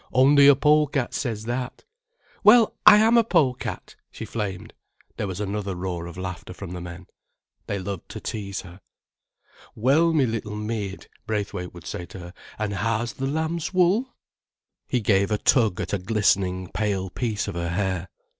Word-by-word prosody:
"Only 140 +2 +6
a 145 - +8
pole 150 +2 +4
cat 135 -3 -2
says 110 -5 -3
that." 125 +2 -4 0.6
"Well, 225 +1 +6
I 210 0 +11
am 225 +2 +5
a - - +4
pole 160 - +3
cat," - - -7
she - - -8
flamed. 100 -5 -5 0.4
There 105 - -2
was 95 0 -5
another 100 -1 -3
roar 90 -1 -4
of 85 0 -10
laughter 90 -1 -6
from 95 -3 -8
the 90 -1 -6
men. 90 +1 -9 0.6
They 100 - -2
loved 95 -1 -6
to - - -7
tease 100 -3 -5
her. 90 +1 -13 0.9
"Well, 140 +9 +3
me 150 -5 +3
little 110 -2 -3
maid," 105 -2 -4 0.2
Braithwaite 100 -4 -3
would 85 - -11
say 85 - -5
to 90 - -11
her, 90 0 -10 0.2
"an' 105 -1 -2
how's 115 +3 -1
th' - - -13
lamb's 160 +5 -2
wool?" 190 +9 +2 0.7
He 125 - 0
gave 100 -1 +2
a 105 - +1
tug 110 -6 +3
at - - -4
a 100 - +1
glistening, 95 -2 +1
pale 100 -3 -1
piece 110 -2 -2
of - - -4
her 85 0 -3
hair. 95 0 -2
105 Hz, 175 wpm, -24 LUFS, 95-135 Hz, 0.9 s, I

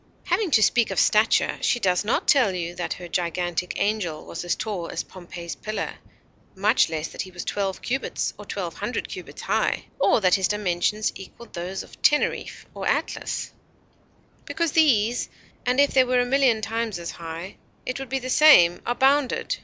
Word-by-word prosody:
Having 425 -5 0
to 220 -7 +4
speak 235 +1 +3
of - - -1
stature, 215 +1 +3
she 240 - +1
does 185 -3 +1
not 210 - 0
tell 245 -10 +4
you 175 -1 -3
that 175 - -3
her 180 - -9
gigantic 175 0 -2
angel 200 -7 -1
was 165 - -6
as 175 - 0
tall 205 -6 -4
as - - -3
Pompey's 175 -2 -8
Pillar; 215 +7 -4 0.6
much 205 +2 +3
less 160 0 -3
that - - -5
he 185 - -7
was 180 -1 -8
twelve 195 -2 -2
cubits 265 +2 -2
or - - -9
twelve - - -4
hundred - - -3
cubits - - -9
high; - - 0
or - - +4
that 185 -4 +3
his 190 -2 +3
dimensions 210 +1 0
equalled 195 +5 -12
those 180 +2 -4
of - - -17
Teneriffe 295 - +1
or - - -4
Atlas; - - -2 0.9
because 335 -2 -1
these, 245 -7 +3 0.4
and 250 +2 +2
if 285 0 +5
they 260 - +5
were 250 0 +2
a - - 0
million 255 -3 +3
times 225 -2 -2
as 170 -1 -5
high, 165 +3 -8 0.3
it 255 - -3
would 270 -2 -7
be 270 - 0
the 255 -1 -5
same, 255 - +6
are 240 - 0
bounded. 280 - +2
210 Hz, 185 wpm, -24 LUFS, 175-250 Hz, 0.9 s, same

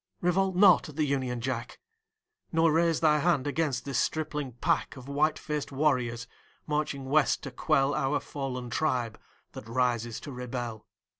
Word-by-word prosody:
Revolt 185 +1 +1
not 185 -3 +6
at 150 - -11
the 155 -1 +1
Union 130 -4 -1
Jack, 125 -1 -4 0.7
Nor 165 0 +3
raise 165 0 +2
Thy 150 -2 +4
hand 150 -4 +2
against 145 -2 -1
this 140 -3 -1
stripling 150 -4 -2
pack 160 +7 0
Of 130 0 -11
white 150 +2 +1
faced 150 -2 -4
warriors, 125 -5 0 0.4
marching 150 -3 -2
West 145 +2 +2
to 140 - -6
quell 135 +1 +1
Our 135 +2 +1
fallen 125 -4 -5
tribe 125 -6 -1 0.3
that 110 - -10
rises 120 -2 0
to 145 - -8
rebel. 120 -3 -5
140 Hz, 155 wpm, -29 LUFS, 125-155 Hz, 0.7 s, not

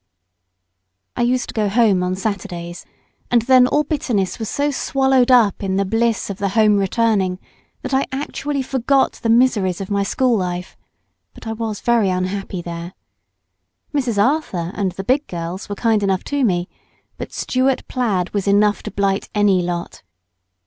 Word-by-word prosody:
I - - -2
used 250 +1 +1
to - - -6
go 210 -2 0
home 210 -3 +3
on 180 0 -1
Saturdays, 185 -4 -5 0.4
and 240 -2 +3
then 255 0 +5
all 295 +3 +2
bitterness 250 - -1
was 220 - -4
so 290 +1 0
swallowed 265 -2 +2
up 235 -6 +4
in 190 -1 -1
the 200 +1 +1
bliss 225 0 0
of 195 - -7
the 200 - 0
homereturning, 205 -2 +2 0.5
that 260 - -4
I 265 +1 +2
actually 280 0 -3
forgot 265 +1 +1
the 230 - -1
miseries 225 -7 +3
of 195 0 -6
my 200 0 +1
school 245 +5 +1
life; 180 -2 -3 0.6
but - - -13
I 225 - -3
was 220 -2 -4
very 235 -4 +2
unhappy 185 0 -3
there. 170 +1 -7 1.0
Mrs. 250 -7 -1
Arthur 200 - 0
and 195 -3 -1
the 190 - -6
big 270 +8 +1
girls 175 +3 -6
were 205 - -3
kind 225 -1 +1
enough 195 -2 0
to 285 -1 +1
me, 180 -6 +1 0.5
but - - -6
Stuart 260 +1 0
plaid 205 -8 -1
was 200 -1 -1
enough 205 +1 +3
to - - -6
blight 200 -1 -1
any 205 -3 +3
lot. 175 -1 -4
210 Hz, 165 wpm, -20 LUFS, 190-250 Hz, 1.0 s, then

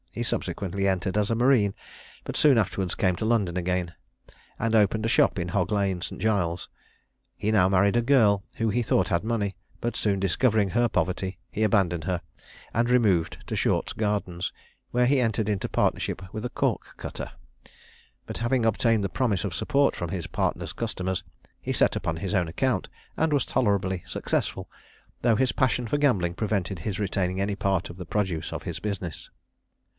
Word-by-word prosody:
He - - -3
subsequently 100 0 -1
entered 95 0 -1
as 105 -1 +1
a - - +2
marine, 120 -5 +4 0.5
but - - -5
soon 145 -5 +5
afterwards 95 -3 0
came 90 -2 +2
to - - -3
London 110 -6 +1
again, 90 -1 -1 0.7
and 115 0 +1
opened 110 +1 +3
a - - +1
shop - - +3
in 90 0 -2
Hog 90 +1 0
lane, 100 -3 0
St. - - -6
Giles's. 90 -6 0 0.7
He 105 - -1
now 95 -4 +4
married 100 +2 +3
a 120 - +4
girl 115 -6 +4
who 115 -1 +1
he 120 +4 +1
thought 95 -5 +2
had 85 0 +1
money; 105 -4 -1 0.2
but 120 -1 -2
soon 100 -3 0
discovering 100 +1 +2
her 120 0 +2
poverty, 95 -1 -1
he 110 - -2
abandoned 95 -6 +2
her, 90 -2 0 0.5
and 120 +2 +1
removed 100 -10 +3
to - - -3
Short's - - +1
Gardens, 100 -5 -1 0.4
where 125 0 +2
he 135 +1 +3
entered 110 -3 0
into 105 -3 -1
partnership - - 0
with 110 0 -4
a - - -1
cork - - 0 0.2
cutter; - - -6 0.9
but - - -6
having 120 0 +1
obtained 115 0 +2
the - - +2
promise 105 -1 0
of 95 - -3
support 140 - +2
from 85 - -4
his 90 -2 -4
partner's - - -2
customers, 95 -5 -3 0.4
he - - -3
set - - +3
up 90 - -4
on 80 0 0
his 95 +4 -3
own 90 -4 +2
account, 110 +3 0 0.3
and 160 0 +1
was 145 -4 +2
tolerably 95 -5 +1
successful, - - -2 0.5
though 115 -2 +4
his 130 -1 +2
passion 125 -3 +1
for 145 - +1
gambling 100 -13 +2
prevented 100 -3 -1
his 95 +4 -3
retaining 95 -2 -1
any 100 +1 0
part 95 -3 0
of 85 - -8
the 90 - -7
produce 90 -3 -1
of - - -5
his - - -5
business. 95 -6 -5
100 Hz, 185 wpm, -26 LUFS, 90-115 Hz, 0.9 s, soon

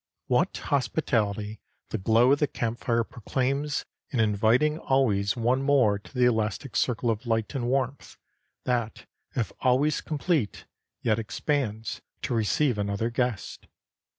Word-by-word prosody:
What - - +1
hospitality 110 -7 0 0.3
the - - -2
glow 115 +6 +4
of 140 - +4
the 150 - +2
camp 115 -2 -3
fire 115 -1 +1
proclaims 135 +6 -2 0.2
in 130 - -2
inviting 115 +9 +3
always 105 -9 +2
one 125 +3 +2
more 130 -8 +3
to - - -16
the 125 -1 +4
elastic 110 +2 0
circle 120 -1 +1
of 115 +2 -4
light 115 +1 0
and 125 -4 -2
warmth, 135 +1 -2 0.5
that 120 -3 -1 0.3
if 115 -7 -1
always 130 +4 +2
complete, 150 - -1 0.4
yet 110 -1 +2
expands 110 -1 -2 0.2
to - - -1
receive 115 +2 +1
another 100 +3 -1
guest. 120 -4 -2
120 Hz, 135 wpm, -27 LUFS, 110-135 Hz, 0.5 s, glow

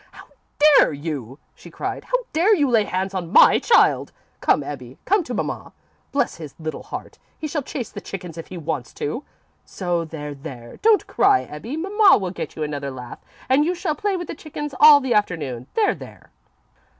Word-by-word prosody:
"How - - -13 0.5
dare - - +4
you!" 140 -4 -5 0.2
she - - -14
cried. - - -5
"How - - +1 0.2
dare 365 +7 +4
you 290 -6 +2
lay 220 -3 +4
hands 190 +1 -2
on 175 -3 -4
my - - +7
child! 470 - +3 0.3
Come, - - +2
Ebbie, - - -8
come 405 -2 +3
to 245 - -4
mamma. - - -4 0.4
Bless 280 - 0
his 155 -4 -9
little 155 -1 -5
heart, - - -8 0.2
he 310 - -4
shall 300 0 -2
chase 255 -3 -6
the - - -8
chickens 180 -4 -7
if 165 - -8
he 185 - -8
wants 155 -6 -4
to, 200 - -3 0.4
so 175 -3 -2
there, 150 -2 -7
there. 125 -4 -10
Don't 435 -1 +3
cry, 395 0 +3
Ebbie. 225 - -7
Mamma 395 +4 +5
will 185 -3 -3
get 180 - -6
you 155 - -3
another 145 -2 -3
lath 125 -2 -9 0.2
and 265 +3 +4
you 350 +4 0
shall 345 -3 -1
play 390 +5 -1
with 350 - -5
the - - -5
chickens 295 -2 -7
all 295 -1 +9
the 260 -2 0
afternoon. 150 - -1
There, 430 -2 +3
there!" - - -13
195 Hz, 195 wpm, -22 LUFS, -, 0.5 s, all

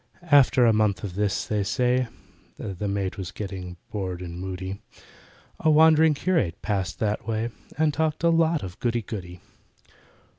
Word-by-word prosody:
After 130 -3 +6
a 115 - +5
month 105 -4 +1
of 100 -4 -4
this, 100 +1 0
they 105 -1 -1
say 125 +3 +1 0.5
(The 100 +1 -4
maid 100 -1 -2
was 95 -3 -5
getting 95 -3 -6
bored 90 -3 -4
and 85 0 -7
moody) 95 +1 -5 0.8
A 160 - +2
wandering 155 0 +6
curate 140 - 0
passed 95 -5 -1
that 105 +1 -2
way 115 +1 -1 0.3
And 155 -1 +2
talked 160 +1 -1
a 170 - +5
lot 165 -1 +2
of 95 +2 -8
goody 120 -1 0
goody. 90 -5 -7
105 Hz, 155 wpm, -25 LUFS, 95-140 Hz, 0.8 s, After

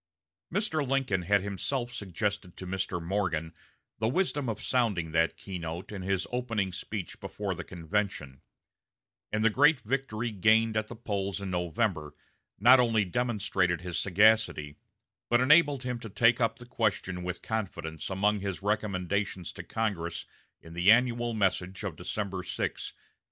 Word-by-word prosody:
Mr. 180 -4 0
Lincoln 135 -8 0
had 100 +2 +2
himself 120 +5 -2
suggested 100 -2 -3
to 95 - -6
Mr. 95 -1 -2
Morgan 85 -2 -1 0.5
the 110 - +1
wisdom 145 -2 0
of 110 -1 -3
sounding 105 -10 0
that 80 +1 +2
key 95 -3 -6
note 85 +3 -6
in 100 -3 -5
his 95 0 0
opening 115 -7 -1
speech 95 0 -5
before - - -4
the - - -6
convention; 85 -6 -3 0.9
and 110 +1 +1
the - - +7
great 145 +5 +5
victory 120 -2 -2
gained 110 +2 +3
at 110 0 0
the 120 - -8
polls 100 -3 -2
in 100 -1 -4
November 85 -3 -1 0.4
not 125 +5 +7
only 115 -4 +3
demonstrated 95 -5 0
his 90 -2 -3
sagacity, 100 -6 +3 0.5
but 120 - +4
enabled 145 0 +5
him 125 -1 -3
to 115 - -8
take 115 +4 +3
up 115 - +2
the 120 - -11
question 100 -6 -1
with 90 0 -4
confidence 90 -8 -4
among 100 +2 +1
his 100 -1 -4
recommendations 100 -3 -1
to - - -8
Congress 100 -7 -2 0.4
in 80 - -11
the 90 +3 +3
annual 120 0 +3
message 95 -2 0
of - - -3
December 100 -3 -3
6, - - -13
1864. - - -2
100 Hz, 155 wpm, -29 LUFS, 90-115 Hz, 0.9 s, the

